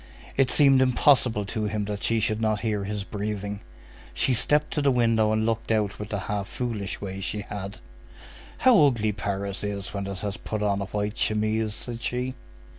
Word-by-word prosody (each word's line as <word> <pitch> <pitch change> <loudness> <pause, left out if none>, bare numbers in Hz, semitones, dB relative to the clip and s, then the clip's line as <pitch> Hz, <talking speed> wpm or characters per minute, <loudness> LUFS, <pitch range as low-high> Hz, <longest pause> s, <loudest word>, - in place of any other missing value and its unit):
It 135 -2 +3
seemed 135 -3 +5
impossible 125 -4 +3
to 110 +1 -3
him 105 0 -1
that 105 0 -4
she 115 0 +1
should 110 0 0
not 110 -2 +1
hear 105 -3 -1
his 105 0 -3
breathing. 105 0 -4 0.6
She 130 - +2
stepped 150 +5 +2
to 150 - 0
the 140 - +3
window 115 -4 +3
and 110 0 +1
looked 115 0 -1
out 105 -3 0
with 105 0 -6
the 100 -2 -2
half 100 -2 -3
foolish 110 -5 -3
way 95 -1 -5
she 105 +2 -3
had. 100 0 -6 0.8
"How 230 - +6
ugly 110 -5 +1
Paris 100 -1 -3
is 100 -2 -4
when 100 -1 -3
it 100 -2 -5
has 100 -2 -3
put 110 -1 -4
on 100 -1 +1
a - - -2
white 105 +2 -3
chemise!" 110 0 +1
said 120 -1 -5
she. 125 +2 -2
105 Hz, 190 wpm, -26 LUFS, 100-115 Hz, 0.8 s, How